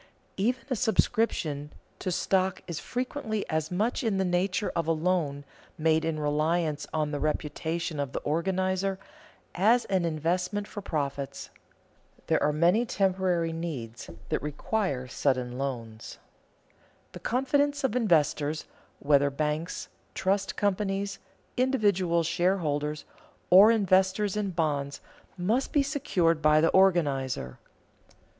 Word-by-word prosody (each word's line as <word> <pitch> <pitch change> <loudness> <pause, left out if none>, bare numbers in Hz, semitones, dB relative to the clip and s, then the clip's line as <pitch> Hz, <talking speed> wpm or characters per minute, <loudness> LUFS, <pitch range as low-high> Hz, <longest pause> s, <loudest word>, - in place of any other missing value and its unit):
Even 245 +6 0
a - - +2
subscription 205 - 0 0.3
to 185 - -2
stock 185 +1 0
is 170 -4 -5
frequently 245 -4 -3
as 155 0 -1
much 210 +9 -1
in 220 -4 +1
the 190 - +1
nature 180 +2 0
of 165 -2 -1
a - - +3
loan, 155 -4 0 0.3
made 160 0 +2
in 160 -1 -1
reliance 150 +1 0
on 155 -1 -1
the 145 - -2
reputation 155 +1 -2
of 140 -2 -2
the - - -3
organizer, 185 +4 0 0.6
as 225 +6 +3
an 190 -3 0
investment 180 +5 -1
for 205 - -7
profits. 140 -6 -4 0.7
There - - +1
are 150 - +3
many 175 +9 +3
temporary 185 -6 0
needs 135 -9 -6 0.2
that - - 0
require 150 - -2
sudden 125 -1 -1
loans. 115 -5 -5 0.9
The - - -9
confidence 285 +3 +1
of 260 -3 0
investors, 155 - +1 0.3
whether 140 0 +3
banks, 150 +4 -3 0.3
trust 195 +1 0
companies, 200 0 -1 0.4
individual 200 -10 +2
shareholders 155 -4 0 0.5
or 195 +4 +9
investors 195 -1 +2
in 210 -2 -1
bonds, 145 -5 -1 0.4
must 220 +9 0
be 285 - +3
secured 185 - +1
by 155 0 +5
the 165 - +4
organizer. 140 - +2
175 Hz, 125 wpm, -28 LUFS, 150-200 Hz, 0.9 s, or